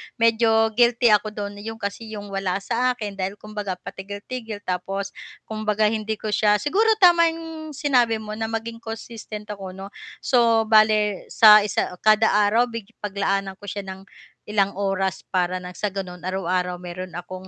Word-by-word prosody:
medyo 225 -1 +3
guilty 240 +1 +3
ako 210 0 +3
do'n, 205 -1 -5
'yon 225 0 -5
kasi 200 +2 -5
'yong 205 -1 -7
wala 195 -2 -1
sa 250 +4 +1
akin 210 -4 -6
dahil 195 +1 -3
kumbaga 210 -3 -5
patigil-tigil 205 +4 -7
tapos 195 +2 -3 0.4
kumbaga 215 -1 0
hindi 220 0 -2
ko 215 - -3
siya 210 -1 +4
siguro 390 - +1
tama 345 -2 +6
'yong 325 -1 -8
sinabi 245 -6 +2
mo 215 0 -6
na 220 - -1
maging 225 +1 -4
consistent 225 -1 -8
ako 195 -2 -7
'no. 195 +1 -8 0.4
So 230 -3 +4
bale 215 -2 +3
sa 215 -1 +9
isa 205 - -1
kada 215 +1 +5
araw 210 +4 +3
big 230 -1 -7
paglaanan 195 -1 -1
ko 205 - -12
siya 200 -1 -5
ng 190 0 -8 0.5
ilang 200 -1 +1
oras 195 -1 -1
para 185 0 0
nang 180 0 -9
sa 210 - -1
gano'n 180 -3 -6
araw-araw 180 -1 -1
meron 180 +1 -7
akong 185 +2 -8
210 Hz, 165 wpm, -23 LUFS, 195-225 Hz, 0.5 s, sa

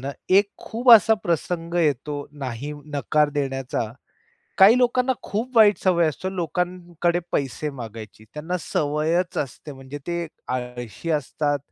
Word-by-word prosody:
ना, 135 +2 -4 0.2
एक 200 +2 +5
खूप 240 +3 +1
असा 220 0 +8
प्रसंग 170 0 -2
येतो 145 -3 0
नाही 135 0 -5 0.2
नकार 150 +1 +2
देण्याचा. 135 -5 -2 0.7
काही 210 +5 +8
लोकांना 250 +1 +2
खूप 235 +4 -4
वाईट 210 -2 +6
सवय 170 -3 +3
असते 185 +6 -4
लोकांकडे 175 0 -1
पैसे 145 +2 -1
मागायची. 110 -5 -9
त्यांना 160 +4 -3
सवयच 155 +5 0
असते. 145 +2 -5
म्हणजे 135 +1 -9
ते 170 -1 -2 0.2
आळशी 125 +4 -5
असतात, 145 -1 0
155 Hz, 130 wpm, -23 LUFS, 140-180 Hz, 0.7 s, असा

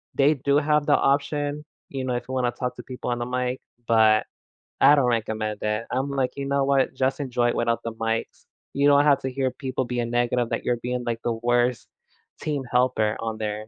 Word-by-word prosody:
they 140 +2 +4
do 140 +2 +1
have 150 0 +2
the 145 - +4
option, 145 +1 0 0.2
you 135 -1 -4
know, 125 -1 -1
if 120 - -4
you - - -4
wanna 125 -2 +1
talk 125 0 -4
to - - -8
people 125 -1 -6
on 120 - -2
the 120 - -2
mic, 125 +1 -2 0.3
but 110 -1 +4 0.6
I 145 - +8
don't 140 -3 +2
recommend 110 -3 -1
it, 105 +2 -1
I'm 130 +3 -1
like, 135 -2 -1
"You 140 - -3
know 140 0 +1
what? 135 -1 +2
Just 130 +1 0
enjoy 120 -3 0
it - - -1
without 115 0 0
the 115 - -4
mics." 115 0 -3 0.3
You 140 +1 +2
don't 145 0 +6
have 140 -2 +5
to 130 - -2
hear 130 0 -1
people 130 -2 -3
being 120 -1 -2
negative 120 0 +1
that - - -2
you're 120 - +1
being, 125 +1 -3
like, 115 -1 -2
the 120 - 0
worst 120 +1 0 0.5
team 145 -3 -2
helper 120 -3 +1
on 115 -1 -3
there. 105 0 -4
125 Hz, 220 wpm, -24 LUFS, 115-140 Hz, 0.6 s, I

